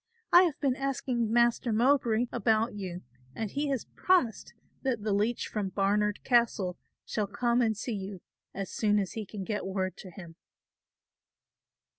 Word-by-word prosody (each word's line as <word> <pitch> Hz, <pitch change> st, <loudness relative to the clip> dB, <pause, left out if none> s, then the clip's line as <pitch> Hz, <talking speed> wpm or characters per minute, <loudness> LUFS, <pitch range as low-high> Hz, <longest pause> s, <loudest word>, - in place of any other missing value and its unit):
I 355 Hz, +1 st, +9 dB
have 320 Hz, -5 st, -2 dB
been 270 Hz, -3 st, +1 dB
asking 255 Hz, -4 st, -1 dB
Master 235 Hz, 0 st, +3 dB
Mowbray 240 Hz, 0 st, +3 dB
about 225 Hz, +1 st, +1 dB
you 185 Hz, -3 st, -6 dB, 0.3 s
and 220 Hz, -3 st, -3 dB
he 290 Hz, +1 st, -1 dB
has 270 Hz, -4 st, -1 dB
promised 360 Hz, -12 st, +1 dB, 0.3 s
that 245 Hz, -6 st, -1 dB
the 210 Hz, -2 st, 0 dB
leech 215 Hz, +4 st, 0 dB
from 205 Hz, -3 st, -2 dB
Barnard 205 Hz, +2 st, 0 dB
Castle 230 Hz, -7 st, +2 dB, 0.3 s
shall 210 Hz, -2 st, -2 dB
come 240 Hz, +4 st, +1 dB
and 220 Hz, -3 st, +1 dB
see 235 Hz, +3 st, -3 dB
you 195 Hz, -2 st, -6 dB, 0.3 s
as 195 Hz, -1 st, -5 dB
soon 210 Hz, -1 st, +2 dB
as 195 Hz, -3 st, -1 dB
he 215 Hz, -3 st, -5 dB
can 200 Hz, -1 st, -6 dB
get 210 Hz, +2 st, -3 dB
word 190 Hz, -1 st, -2 dB
to 190 Hz, -, -10 dB
him." 170 Hz, -3 st, -11 dB
220 Hz, 160 wpm, -29 LUFS, 200-245 Hz, 0.3 s, I